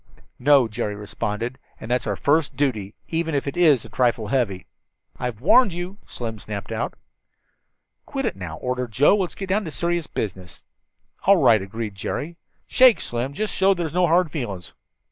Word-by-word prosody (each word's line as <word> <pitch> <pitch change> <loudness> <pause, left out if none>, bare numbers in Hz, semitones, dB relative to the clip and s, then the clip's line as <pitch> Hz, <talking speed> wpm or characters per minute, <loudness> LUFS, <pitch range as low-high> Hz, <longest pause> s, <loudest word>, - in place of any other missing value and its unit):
"No," 135 -2 +5
Jerry 105 -1 -3
responded, 105 +4 -4 0.2
"and 110 - -7
that's 125 - 0
our - - 0
first 150 +1 +1
duty, 110 -8 -1
even 165 -2 -1
if 140 - 0
it 140 - -4
is 155 -9 +4
a - - -11
trifle 120 -4 +1
heavy." 105 -8 0 0.5
"I've 125 -3 -4
warned 200 - +5
you," 180 +4 -6
Slim 110 -3 -6
snapped 100 -2 -6
out. - - -3 1.1
"Quit - - -3
it - - -1
now," 90 -4 -7
ordered 125 +1 -3
Joe. 140 - +5
"Let's 185 -3 -2
get 195 -1 -6
down 205 +3 +1
to - - -4
serious 170 0 -1
business." 95 -3 -6 0.6
"All - - +7
right," 110 -3 +5
agreed 105 +2 -5
Jerry. 150 - -4 0.3
"Shake, 255 -3 +6
Slim, 120 +3 -3
just 215 +8 -2
to - - -3
show 195 +1 +5
there's 170 -3 -3
no 180 0 +3
hard 170 -1 +3
feelings." 100 - -5
130 Hz, 180 wpm, -23 LUFS, 105-170 Hz, 1.1 s, All